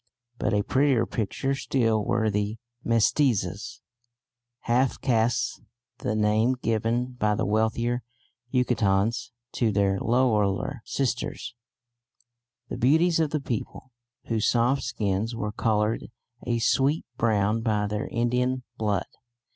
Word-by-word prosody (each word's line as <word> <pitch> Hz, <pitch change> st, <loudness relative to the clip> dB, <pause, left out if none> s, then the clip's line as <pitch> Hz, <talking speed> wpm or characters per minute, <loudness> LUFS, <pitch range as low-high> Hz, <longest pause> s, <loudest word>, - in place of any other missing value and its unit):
But -, -, 0 dB
a 100 Hz, -, +2 dB
prettier 130 Hz, -2 st, +2 dB
picture 120 Hz, +5 st, -2 dB
still 115 Hz, -5 st, +1 dB
were 115 Hz, -2 st, +1 dB
the 105 Hz, +2 st, -1 dB, 0.3 s
Mestizas 115 Hz, -, +1 dB, 0.8 s
(half 125 Hz, +3 st, +1 dB
castes, 115 Hz, -2 st, +1 dB, 0.4 s
the 105 Hz, -, -1 dB
name 110 Hz, +4 st, +2 dB
given 115 Hz, +2 st, 0 dB
by 105 Hz, -4 st, +1 dB
the -, -, -1 dB
wealthier 110 Hz, +3 st, 0 dB, 0.5 s
Yucatecans 115 Hz, -4 st, +1 dB, 0.2 s
to 115 Hz, -3 st, +1 dB
their 100 Hz, -1 st, +1 dB
lowlier 115 Hz, 0 st, +1 dB
sisters), 125 Hz, -2 st, -2 dB, 1.1 s
the -, -, -5 dB
beauties 160 Hz, +7 st, +3 dB
of 160 Hz, -2 st, +2 dB
the 150 Hz, -, -1 dB
people, 130 Hz, +1 st, -5 dB, 0.3 s
whose 110 Hz, -2 st, 0 dB
soft 125 Hz, +3 st, +2 dB
skins 110 Hz, 0 st, -1 dB
were 105 Hz, -2 st, -3 dB
coloured 105 Hz, 0 st, 0 dB, 0.4 s
a 120 Hz, -1 st, +1 dB
sweet 135 Hz, +6 st, +2 dB
brown 110 Hz, -1 st, +1 dB
by 105 Hz, -3 st, +1 dB
their 105 Hz, +1 st, -3 dB
Indian 125 Hz, +2 st, 0 dB, 0.2 s
blood. 105 Hz, -4 st, 0 dB
115 Hz, 115 wpm, -26 LUFS, 105-125 Hz, 1.1 s, beauties